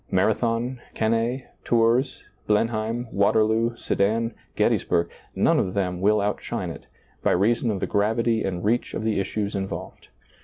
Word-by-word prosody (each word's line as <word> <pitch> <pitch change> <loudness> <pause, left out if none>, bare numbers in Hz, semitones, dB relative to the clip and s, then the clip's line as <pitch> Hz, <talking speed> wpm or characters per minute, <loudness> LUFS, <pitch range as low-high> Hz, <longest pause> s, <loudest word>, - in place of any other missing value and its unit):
Marathon, 115 +5 +1
Cannae, 115 +4 0 0.2
Tours, 120 +3 +2 0.2
Blenheim, 115 +2 0
Waterloo, 110 +3 +2
Sedan, 115 +4 0 0.2
Gettysburg 85 -1 +1 0.2
— - - -36
none - - +3
of 90 - -1
them 90 -2 -1
will 105 +2 +3
outshine 100 +1 -2
it, - - -11 0.3
by - - +2
reason 115 +6 +2
of 100 -3 -1
the - - +1
gravity 115 +2 +1
and 90 -1 -3
reach 115 +3 0
of - - -3
the 110 -2 +1
issues 100 +1 -2
involved. 95 -1 -5
110 Hz, 145 wpm, -24 LUFS, 100-115 Hz, 0.3 s, none